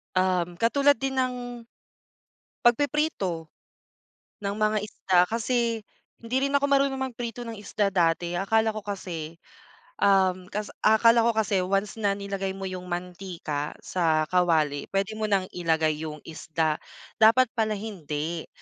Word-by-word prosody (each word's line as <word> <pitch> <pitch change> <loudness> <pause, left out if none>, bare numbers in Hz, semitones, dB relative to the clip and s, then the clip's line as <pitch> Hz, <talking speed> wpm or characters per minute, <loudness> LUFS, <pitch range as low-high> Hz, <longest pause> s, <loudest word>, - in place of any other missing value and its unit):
Um, 180 -2 +1
katulad 280 +3 +4
din 270 +1 -2
ng, 245 -2 -2 1.0
pagpiprito, 240 - +1 0.9
ng 200 0 -1
mga 215 0 +2
isda 190 -3 +1
kasi 230 +2 0 0.4
hindi 230 +2 -5
rin 275 - +1
ako 280 - +3
marunong 275 -1 +2
magprito 240 -2 -4
ng 225 - -5
isda 205 0 -1
dati. 175 -2 +1
Akala 220 +4 +1
ko 215 - -5
kasi, 170 -5 -6 0.6
um, 185 -2 +3
kas 210 +1 -4
akala 230 +2 +5
ko 230 -1 +2
kasi 210 -3 +2
once 195 +4 -1
na 200 -2 +1
nilagay 195 -1 -4
mo 195 - -6
yung 185 -1 -5
mantika 175 -4 -4
sa 160 -3 +1
kawali, 160 -5 +2
pwede 195 +2 -1
mo 215 - 0
ng 195 -2 +2
ilagay 160 -3 +1
yung 155 -1 -5
isda. 160 -1 -2 0.4
Dapat 230 +2 +6
pala 220 -2 0
hindi. 165 -6 -4
200 Hz, 135 wpm, -26 LUFS, 175-230 Hz, 1.0 s, Dapat